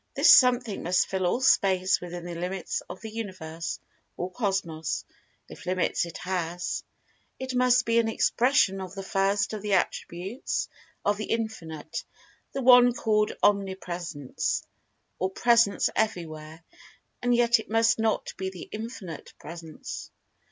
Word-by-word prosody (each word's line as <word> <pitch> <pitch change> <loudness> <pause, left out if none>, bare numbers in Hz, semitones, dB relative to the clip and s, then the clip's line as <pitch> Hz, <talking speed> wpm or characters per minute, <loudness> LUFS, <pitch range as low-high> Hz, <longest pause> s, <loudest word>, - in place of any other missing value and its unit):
This - - +8
Something 245 -4 +4
must 180 +1 +2
fill 190 -1 -1
all 240 +8 0
Space[Pg 260 - +6 0.4
183] - - -6
within 175 0 -7
the 175 - -5
Limits 180 +1 -3
of 185 - -8
the 220 -1 -7
Universe, 170 -7 -5 0.4
or 180 +1 -3
Cosmos—if 185 -7 -4
limits 185 -1 +1
it 170 - -8
has. 180 -1 -3 0.5
It 260 0 -5
must 250 0 +4
be 230 0 +3
an 230 - +2
expression 225 -3 +2
of 185 0 -7
the 195 - -5
first 195 +1 +1
of 215 - -4
the 205 -1 -1
attributes 185 +6 -2 0.4
of 205 0 +2
The 215 - -3
Infinite—the 220 - -5
one 245 -1 +8
called 215 -2 +1
Omnipresence, 180 -7 -1 0.6
or 185 - +1
Presence 235 0 +3
everywhere—and 165 +4 -3
yet 235 -1 +4
it - - -9
must 225 +1 +3
not 220 -1 0
be 190 0 -2
The 185 -3 -10
Infinite 215 -6 -7
Presence. 165 0 -8
195 Hz, 135 wpm, -27 LUFS, 175-225 Hz, 0.6 s, This